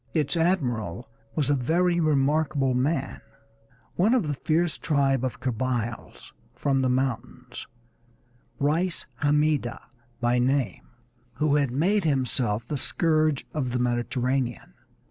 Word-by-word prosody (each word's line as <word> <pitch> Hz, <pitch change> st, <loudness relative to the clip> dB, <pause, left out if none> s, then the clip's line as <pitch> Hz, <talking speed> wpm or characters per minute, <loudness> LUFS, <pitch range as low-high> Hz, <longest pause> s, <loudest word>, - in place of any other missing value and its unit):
Its 150 Hz, 0 st, +1 dB
admiral 125 Hz, -, 0 dB, 0.3 s
was 145 Hz, -2 st, +1 dB
a -, -, +4 dB
very 170 Hz, +7 st, +1 dB
remarkable 145 Hz, -2 st, +2 dB
man, 135 Hz, +3 st, -1 dB, 0.7 s
one 215 Hz, +8 st, +3 dB
of 225 Hz, -11 st, +1 dB
the 145 Hz, -, 0 dB
fierce 160 Hz, +4 st, 0 dB
tribe 135 Hz, -4 st, +1 dB
of 130 Hz, -, -3 dB
Kabyles 120 Hz, -2 st, -3 dB, 0.2 s
from 135 Hz, -2 st, +1 dB
the 130 Hz, -, +1 dB
mountains, 125 Hz, -1 st, -3 dB, 0.9 s
Reis 165 Hz, +5 st, 0 dB, 0.2 s
Hammida 150 Hz, -4 st, +1 dB, 0.4 s
by 120 Hz, +1 st, +2 dB
name, 130 Hz, -5 st, 0 dB, 0.5 s
who 150 Hz, -1 st, +2 dB
had 140 Hz, -3 st, +1 dB
made 180 Hz, -, +1 dB
himself 125 Hz, -6 st, 0 dB
the 150 Hz, -, -2 dB
scourge 155 Hz, -1 st, +1 dB
of 130 Hz, -5 st, -2 dB
the -, -, +1 dB
Mediterranean. 125 Hz, -, -1 dB
135 Hz, 120 wpm, -26 LUFS, 125-155 Hz, 0.9 s, a